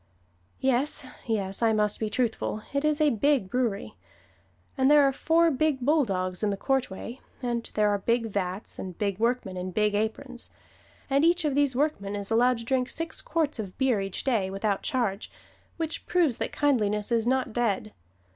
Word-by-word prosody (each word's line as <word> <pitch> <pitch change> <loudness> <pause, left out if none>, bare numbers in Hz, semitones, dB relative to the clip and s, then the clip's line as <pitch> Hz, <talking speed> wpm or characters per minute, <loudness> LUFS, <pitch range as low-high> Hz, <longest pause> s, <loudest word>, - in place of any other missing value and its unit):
Yes, 265 +2 0 0.2
yes, 200 -3 -2
I 225 -1 +4
must 210 -1 +1
be 220 - -1
truthful 220 -2 -1
it 280 +1 0
is 305 0 +2
a 305 -1 +4
big 235 -3 +1
brewery, 235 -6 -1 0.8
and 265 0 +3
there 295 -1 +7
are 275 -1 +3
four 330 +4 +3
big 290 0 +1
bulldogs 195 - +1
in 210 - +1
the 200 - -1
courtway; 255 -1 -2 0.2
and 235 -1 -2
there 210 0 +3
are 205 - 0
big 230 +3 +1
vats, 195 -2 -3
and 185 -2 -6
big 200 -2 -1
workmen 230 -5 0
in 180 +1 -3
big 210 +2 +1
aprons. 235 +4 -3 0.6
And 275 +1 +2
each 345 0 +3
of 295 - +1
these 280 -2 +2
workmen 250 -8 -1
is 200 +1 -5
allowed 245 +2 +4
to 230 - -8
drink 255 0 0
six 330 -1 -3
quarts 310 -5 -1
of 195 -4 -6
beer 255 -6 +2
each 195 -1 -4
day, 220 -8 +1
without 195 +1 -1
charge, 230 -8 -1 0.5
which 325 -1 -4
proves 330 -9 +2
that - - -2
kindliness 210 -7 +1
is 230 -1 +2
not 260 -3 +1
dead. 215 -3 -1
235 Hz, 180 wpm, -27 LUFS, 205-275 Hz, 0.8 s, there